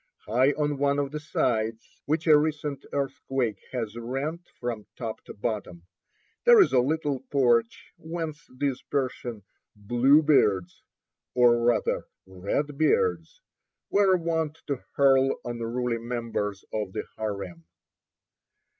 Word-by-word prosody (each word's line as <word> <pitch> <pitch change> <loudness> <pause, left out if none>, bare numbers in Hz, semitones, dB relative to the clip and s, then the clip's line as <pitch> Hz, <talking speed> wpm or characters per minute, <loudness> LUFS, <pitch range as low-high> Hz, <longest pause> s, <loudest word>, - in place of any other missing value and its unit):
High 125 +7 +3
on 145 -2 -1
one 140 0 +2
of 140 -1 -1
the 150 - -4
sides, 115 -6 -2
which 155 +2 0
a 155 -2 +7
recent 150 -2 -1
earthquake 135 -5 -2
has 115 -4 -3
rent 135 +8 -3 0.2
from 115 -3 -4
top 115 -3 -5
to - - -9
bottom, 100 -6 -4 0.6
there 480 -2 +8
is 385 - +5
a - - +6
little 145 +1 0
porch 120 -4 +1
whence 160 -2 -5
these 140 -2 -1
Persian 125 -4 -3 0.3
"Bluebeards," 120 - +3 0.5
or 120 -1 +5
rather 120 -3 +1 0.2
Redbeards, 150 - 0 0.5
were 195 -2 +4
wont 160 -2 -1
to 140 -3 -3
hurl 135 -1 +4
unruly 120 0 -2
members 115 -4 -3
of 105 -3 -3
the - - -3
harem. 100 -6 -5
130 Hz, 120 wpm, -27 LUFS, 115-150 Hz, 0.6 s, there